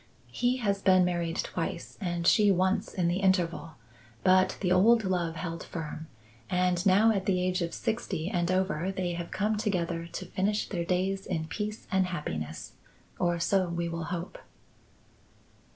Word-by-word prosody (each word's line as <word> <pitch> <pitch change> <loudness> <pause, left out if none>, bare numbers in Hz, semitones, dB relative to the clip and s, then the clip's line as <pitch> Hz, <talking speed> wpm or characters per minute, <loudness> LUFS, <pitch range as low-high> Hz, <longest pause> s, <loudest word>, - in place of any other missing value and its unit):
He 245 +1 +1
has 200 -5 0
been 185 -2 +5
married 170 -2 -1
twice - - -4
and 175 -2 -2
she 210 +3 +5
once 190 +3 +1
in 180 -2 0
the 175 +1 +1
interval; 175 -4 +1 0.5
but 185 0 +4
the 180 -3 0
old 220 +5 +5
love 175 -4 -1
held 165 0 -5
firm 160 -1 -6 0.4
and 180 -1 +1
now 205 +4 +5
at 195 -3 -1
the 185 -2 +2
age 180 0 0
of 170 0 -1
sixty 190 -7 -2
and 175 -2 0
over 185 -1 0
they 185 -2 -2
have 170 0 -5
come 210 +2 0
together 170 -5 -1
to 185 - -5
finish 205 +4 -1
their 170 -4 -3
days 190 +2 -1
in 160 -1 -2
peace 210 +5 -4
and 190 -1 +2
happiness. 80 - -5 0.5
Or 175 -1 +1
so 185 +2 +2
we 170 0 -2
will 165 -1 -4
hope." 175 +1 -5
180 Hz, 165 wpm, -29 LUFS, 170-195 Hz, 0.5 s, been